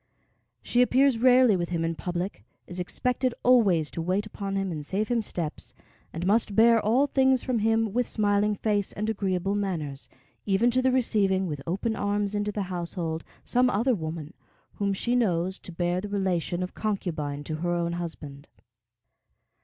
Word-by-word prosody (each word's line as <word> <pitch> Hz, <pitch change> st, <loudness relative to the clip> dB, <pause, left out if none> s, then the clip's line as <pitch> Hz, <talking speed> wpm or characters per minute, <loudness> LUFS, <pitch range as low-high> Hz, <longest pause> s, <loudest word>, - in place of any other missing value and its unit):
She 245 Hz, -, +2 dB
appears 255 Hz, 0 st, +3 dB
rarely 250 Hz, -3 st, +5 dB
with 175 Hz, -2 st, -2 dB
him 165 Hz, -2 st, -1 dB
in 165 Hz, -, -1 dB
public, 175 Hz, -, -4 dB, 0.2 s
is 180 Hz, 0 st, -7 dB
expected 250 Hz, +7 st, -1 dB
always 200 Hz, -, +4 dB
to 165 Hz, -, -4 dB
wait 185 Hz, +5 st, 0 dB
upon 200 Hz, -2 st, -5 dB
him 195 Hz, -1 st, -1 dB
and 155 Hz, -3 st, -5 dB
save 200 Hz, +8 st, -2 dB
him 240 Hz, -2 st, +1 dB
steps, 170 Hz, -7 st, -5 dB, 0.4 s
and 165 Hz, +2 st, -4 dB
must 205 Hz, +1 st, +2 dB
bear 230 Hz, 0 st, +6 dB
all 245 Hz, +7 st, +3 dB
things 265 Hz, -2 st, +2 dB
from 250 Hz, -3 st, 0 dB
him 225 Hz, -1 st, +1 dB
with 245 Hz, +1 st, +1 dB
smiling 205 Hz, 0 st, +1 dB
face 205 Hz, -1 st, -1 dB
and 215 Hz, +2 st, -2 dB
agreeable 195 Hz, -2 st, -1 dB
manners, 165 Hz, -9 st, -3 dB, 0.3 s
even 205 Hz, +5 st, +2 dB
to 255 Hz, +2 st, +2 dB
the 260 Hz, 0 st, +2 dB
receiving 200 Hz, -7 st, +2 dB
with 150 Hz, -5 st, -4 dB
open 200 Hz, +6 st, -1 dB
arms 205 Hz, 0 st, -1 dB
into 205 Hz, 0 st, -1 dB
the 205 Hz, -1 st, -2 dB
household 170 Hz, -3 st, -4 dB, 0.2 s
some 250 Hz, +1 st, +2 dB
other 245 Hz, +4 st, +2 dB
woman, 160 Hz, -3 st, -5 dB, 0.4 s
whom 200 Hz, -1 st, -1 dB
she 235 Hz, +5 st, 0 dB
knows 185 Hz, -5 st, 0 dB
to -, -, -10 dB
bear 175 Hz, +1 st, -1 dB
the 205 Hz, -, -6 dB
relation 185 Hz, -3 st, -1 dB
of 180 Hz, -, -6 dB
concubine 155 Hz, -9 st, -3 dB
to 155 Hz, +1 st, -4 dB
her 175 Hz, +2 st, -2 dB
own 170 Hz, 0 st, -1 dB
husband. 155 Hz, -5 st, -7 dB
195 Hz, 175 wpm, -27 LUFS, 175-225 Hz, 0.4 s, bear